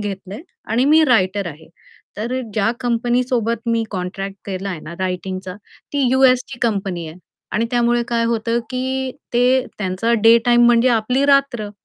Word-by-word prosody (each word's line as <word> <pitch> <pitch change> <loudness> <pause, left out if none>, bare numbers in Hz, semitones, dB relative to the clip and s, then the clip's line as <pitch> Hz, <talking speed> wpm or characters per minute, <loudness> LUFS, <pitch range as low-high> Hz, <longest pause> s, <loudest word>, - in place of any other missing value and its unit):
घेतलंय 200 +3 -6 0.2
आणि 230 +4 +1
मी 310 +3 +5
रायटर 200 -7 +2
आहे. 155 -2 -9 0.5
तर 240 +5 -3
ज्या 215 +1 +2
कंपनी 240 0 +1
सोबत 235 -2 -2
मी 230 0 +1
कॉन्ट्रॅक्ट 195 +1 -5
केलाय 190 -2 -4
ना, 170 - -8
रायटिंगचा 185 0 -4 0.4
ती 285 -2 +1
यू-एसची 255 -2 +3
कंपनी 195 -7 -1
आहे 155 - -11 0.4
आणि 230 +1 0
त्यामुळे 240 -1 +2
काय 235 -1 0
होतं 230 0 0
की 260 +1 -2 0.2
ते 250 +2 +3
त्यांचा 195 +3 -1
डे 225 +1 +7
टाईम 240 0 +5
म्हणजे 240 +1 +4
आपली 250 +5 0
रात्र. 275 -7 +2
230 Hz, 150 wpm, -19 LUFS, 195-250 Hz, 0.5 s, डे